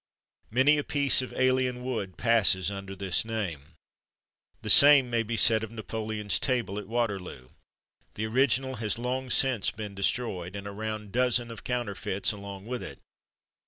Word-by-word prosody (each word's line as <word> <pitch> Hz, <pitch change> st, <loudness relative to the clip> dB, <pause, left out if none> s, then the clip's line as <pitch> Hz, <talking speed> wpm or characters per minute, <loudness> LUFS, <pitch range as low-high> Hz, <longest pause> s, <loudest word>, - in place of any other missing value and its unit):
Many 140 Hz, +6 st, +4 dB
a -, -, -2 dB
piece 140 Hz, -2 st, +2 dB
of 130 Hz, -, -6 dB
alien 130 Hz, -1 st, +1 dB
wood 110 Hz, -8 st, -4 dB
passes 100 Hz, -6 st, +3 dB
under 95 Hz, 0 st, -7 dB
this 95 Hz, -2 st, 0 dB
name. 85 Hz, -9 st, -5 dB, 0.9 s
The 110 Hz, -, -4 dB
same 140 Hz, -3 st, +7 dB
may 115 Hz, -1 st, +2 dB
be 115 Hz, +1 st, -3 dB
said 110 Hz, 0 st, +4 dB
of 110 Hz, -, -5 dB
Napoleon's 110 Hz, -1 st, -2 dB
table 120 Hz, -6 st, -1 dB
at 105 Hz, -, -9 dB
Waterloo. 100 Hz, -, -3 dB, 0.7 s
The 110 Hz, -, -2 dB
original 130 Hz, +2 st, +1 dB
has 110 Hz, -2 st, -1 dB
long 125 Hz, +2 st, -3 dB
since 125 Hz, -4 st, +2 dB
been 105 Hz, -2 st, -7 dB
destroyed, 100 Hz, -3 st, -2 dB
and 100 Hz, 0 st, -6 dB
a 100 Hz, -, -5 dB
round 110 Hz, 0 st, -5 dB
dozen 120 Hz, -1 st, +1 dB
of 115 Hz, -, -10 dB
counterfeits 105 Hz, -5 st, -2 dB
along 100 Hz, -1 st, -9 dB
with 125 Hz, +1 st, -4 dB
it. -, -, -8 dB
110 Hz, 160 wpm, -28 LUFS, 100-125 Hz, 0.9 s, same